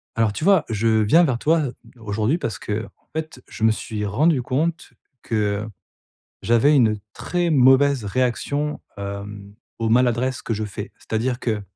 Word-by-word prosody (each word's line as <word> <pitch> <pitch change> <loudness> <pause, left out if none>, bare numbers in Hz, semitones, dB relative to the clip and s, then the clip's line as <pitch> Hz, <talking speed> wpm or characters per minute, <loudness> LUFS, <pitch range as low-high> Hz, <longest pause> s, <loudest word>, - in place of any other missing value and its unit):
Alors 115 -2 +1
tu 155 - -5
vois, 195 -4 +4
je 110 0 0
viens 160 +12 +5
vers 130 -7 +1
toi 160 +5 +2 0.4
aujourd'hui 110 +6 -1
parce 115 - -4
qu'en 105 +2 -4 0.3
fait, 155 -5 -5
je 110 - -8
me 110 - +5
suis 110 -1 -4
rendu 140 +8 +2
compte 155 +7 -2 0.3
que 105 -1 -1 0.8
j'avais 120 +6 +4
une 110 -5 +3 0.2
très 175 -1 -1
mauvaise 135 -2 +4
réaction, 130 +6 -1 0.2
hem, 100 0 -7 0.3
aux 115 -1 0
maladresses 125 +2 +2
que 115 - -3
je 110 0 -3
fais. 105 +1 -7
C'est-à-dire 120 +3 -2
que, 110 -5 -2
120 Hz, 155 wpm, -22 LUFS, 105-140 Hz, 0.8 s, viens